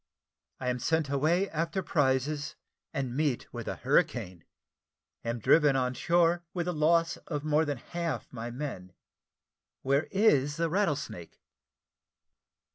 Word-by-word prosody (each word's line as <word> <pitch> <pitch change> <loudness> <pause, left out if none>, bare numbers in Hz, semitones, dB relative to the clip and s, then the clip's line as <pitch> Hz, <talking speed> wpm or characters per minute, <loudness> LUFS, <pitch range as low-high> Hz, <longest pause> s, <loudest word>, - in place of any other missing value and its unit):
I 125 - -2
AM 125 0 -1
SENT 160 +3 0
AWAY 160 +7 +2
AFTER 165 +4 -2
PRIZES 145 0 0 0.4
AND 130 -3 -3
MEET 145 -4 -1
WITH - - -6
A - - -2
HURRICANE 90 -3 0 0.8
AM 115 +1 -2
DRIVEN 145 +5 +4
ON 125 -1 +1
SHORE, 175 +4 +2
WITH 175 -2 -1
THE 180 - -1
LOSS 165 +2 +2
OF 150 -3 -3
MORE 155 +1 +2
THAN 145 -2 -2
HALF 165 -1 -4
MY 115 -1 -5
MEN 120 - -6 0.9
WHERE 140 +2 +2
IS 145 -9 +3
THE 165 -1 0
"RATTLESNAKE?" 145 - -2
150 Hz, 130 wpm, -29 LUFS, 130-165 Hz, 0.9 s, DRIVEN